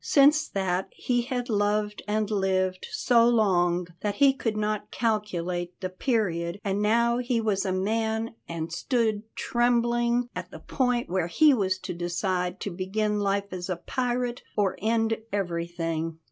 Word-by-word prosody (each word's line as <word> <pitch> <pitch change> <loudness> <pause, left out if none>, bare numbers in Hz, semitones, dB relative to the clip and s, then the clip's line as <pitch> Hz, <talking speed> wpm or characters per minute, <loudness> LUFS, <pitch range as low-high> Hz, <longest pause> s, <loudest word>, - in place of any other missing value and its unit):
Since 300 +2 +5
that 190 -1 -1
he 245 -1 0
had 245 0 -3
loved 210 -1 0
and 215 0 0
lived 185 -2 0
so 235 -2 +4
long 180 -6 +2 0.2
that 205 -1 -1
he 275 +3 +5
could 225 -5 -2
not 210 0 -1
calculate 180 -6 -2
the 185 -2 -4
period, 185 -4 -1
and 200 0 -1
now 235 +3 +3
he 245 -1 0
was 210 -3 0
a - - 0
man 220 +4 -1 0.2
and 165 0 -4
stood 220 +1 0
trembling 240 0 +1
at - - -5
the - - -9
point 250 -3 0
where 180 -2 0
he 300 - +5
was 190 -6 +1
to 185 - -6
decide 180 +1 -2
to 200 - -3
begin 210 +4 -1
life 200 -1 -1
as 180 0 -5
a 180 - 0
pirate 245 +5 -2 0.2
or 200 -2 +2
end 225 +1 +1
everything. 170 -3 -2
210 Hz, 155 wpm, -27 LUFS, 185-235 Hz, 0.2 s, Since